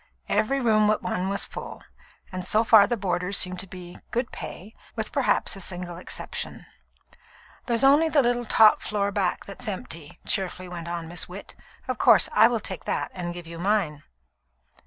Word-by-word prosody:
Every 275 Hz, +5 st, +1 dB
room 215 Hz, -4 st, +3 dB
but 215 Hz, 0 st, +1 dB
one 185 Hz, +1 st, -2 dB
was 200 Hz, -, +1 dB
full, -, -, -9 dB, 0.5 s
and 185 Hz, -1 st, -5 dB
so 215 Hz, +4 st, +3 dB
far 220 Hz, -3 st, +7 dB
the 240 Hz, -, -1 dB
boarders 185 Hz, 0 st, 0 dB
seemed 180 Hz, -1 st, +3 dB
to 190 Hz, -, -5 dB
be 180 Hz, -1 st, -11 dB
"good 240 Hz, +1 st, -2 dB
pay," 205 Hz, +5 st, -8 dB, 0.2 s
with -, -, -3 dB
perhaps -, -, +1 dB
a -, -, -9 dB
single 175 Hz, -2 st, -3 dB
exception. 180 Hz, -, -5 dB, 1.0 s
"There's 235 Hz, 0 st, +1 dB
only 290 Hz, +4 st, +5 dB
the 290 Hz, -3 st, +3 dB
little 240 Hz, 0 st, 0 dB
top 215 Hz, -1 st, +5 dB
floor 200 Hz, -1 st, -1 dB
back 195 Hz, -3 st, -1 dB
that's 210 Hz, +5 st, -6 dB
empty," 165 Hz, -6 st, -6 dB
cheerfully 185 Hz, -1 st, -2 dB
went 170 Hz, -1 st, -7 dB
on 170 Hz, -1 st, -4 dB
Miss 175 Hz, +1 st, -4 dB
Witt. 190 Hz, +3 st, -9 dB, 0.3 s
"Of -, -, -3 dB
course, -, -, +5 dB
I -, -, +7 dB
will 235 Hz, -2 st, -1 dB
take 190 Hz, -4 st, -5 dB
that -, -, -2 dB
and 175 Hz, -2 st, -4 dB
give 175 Hz, 0 st, -8 dB
you 165 Hz, 0 st, -9 dB
mine." 180 Hz, -6 st, 0 dB
195 Hz, 180 wpm, -25 LUFS, 175-220 Hz, 1.0 s, far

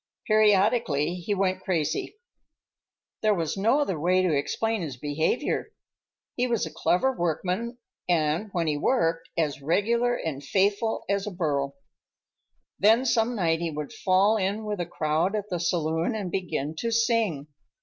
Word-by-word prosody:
Periodically 210 Hz, -, +3 dB
he 180 Hz, +3 st, -2 dB
went 185 Hz, -1 st, 0 dB
crazy. 165 Hz, -, -1 dB, 1.1 s
There 215 Hz, -1 st, +3 dB
was 165 Hz, -4 st, -2 dB
no 230 Hz, +9 st, +2 dB
other 190 Hz, -, -1 dB
way 185 Hz, +4 st, +2 dB
to 180 Hz, -4 st, +2 dB
explain 220 Hz, +9 st, -1 dB
his 145 Hz, -7 st, -5 dB
behavior. 150 Hz, -, -1 dB, 0.6 s
He 250 Hz, 0 st, +1 dB
was 235 Hz, -3 st, 0 dB
a -, -, -8 dB
clever 260 Hz, +9 st, +1 dB
workman, 185 Hz, +7 st, -2 dB, 0.3 s
and, 165 Hz, +4 st, +1 dB
when 170 Hz, -3 st, -1 dB
he 150 Hz, -2 st, 0 dB
worked, 165 Hz, -, 0 dB
as 155 Hz, -3 st, -1 dB
regular 235 Hz, -, +1 dB
and 145 Hz, -, -4 dB
faithful 200 Hz, +7 st, +1 dB
as 200 Hz, 0 st, -1 dB
a -, -, -3 dB
burro. 140 Hz, -6 st, -1 dB, 1.0 s
Then 225 Hz, +6 st, +5 dB
some 235 Hz, 0 st, +2 dB
night 165 Hz, -5 st, +1 dB
he 170 Hz, -, -1 dB
would 150 Hz, -2 st, -6 dB
fall 195 Hz, +3 st, +3 dB
in 205 Hz, +2 st, -1 dB
with 210 Hz, -2 st, -3 dB
a 175 Hz, -, -2 dB
crowd 160 Hz, +4 st, 0 dB
at 210 Hz, 0 st, -3 dB
the 175 Hz, -, -1 dB
saloon 165 Hz, +3 st, 0 dB
and 195 Hz, -5 st, -4 dB
begin 160 Hz, -6 st, -2 dB
to 230 Hz, -, -1 dB
sing. 230 Hz, -, +1 dB
185 Hz, 155 wpm, -26 LUFS, 160-215 Hz, 1.1 s, Then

